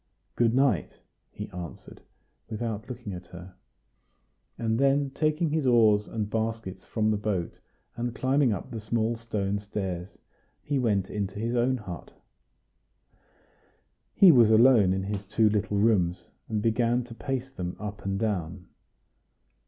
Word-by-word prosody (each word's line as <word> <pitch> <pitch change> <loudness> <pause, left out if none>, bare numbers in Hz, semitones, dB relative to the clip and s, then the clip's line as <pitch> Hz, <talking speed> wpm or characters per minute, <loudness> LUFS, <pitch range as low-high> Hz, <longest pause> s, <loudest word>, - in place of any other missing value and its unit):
"Good 120 0 +2
night!" 135 -1 +1 0.3
he - - -7
answered, 90 -2 -9 0.5
without 110 0 -4
looking 120 -5 -6
at 90 0 -8
her; 90 +1 -11 1.0
and 110 0 0
then 140 0 +2
taking 155 +2 0
his 155 -3 0
oars 110 -4 +4
and 110 -2 -3
baskets 110 -4 -3
from 110 -1 +1
the 105 - +1
boat, 100 -5 -3 0.4
and 120 0 -3
climbing 130 -1 +2
up 100 +1 -4
the 115 - -4
small 110 +1 0
stone 105 -3 -2
stairs, 95 -3 -5 0.5
he 145 -2 0
went 100 -6 0
into 100 -1 -3
his 115 +3 -2
own 125 +2 +2
hut. 95 -7 -9 2.0
He 190 -3 +8
was 120 -6 +6
alone 110 -3 +6
in 95 0 -1
his 100 0 -3
two 105 +2 +2
little 105 -1 0
rooms, 95 -5 +2 0.2
and 105 -2 -1
began 120 +2 +2
to 120 -1 -11
pace 135 +1 -4
them 90 -8 -5
up 105 0 -6
and 95 0 -1
down. 95 -4 -3
110 Hz, 145 wpm, -27 LUFS, 100-120 Hz, 2.0 s, He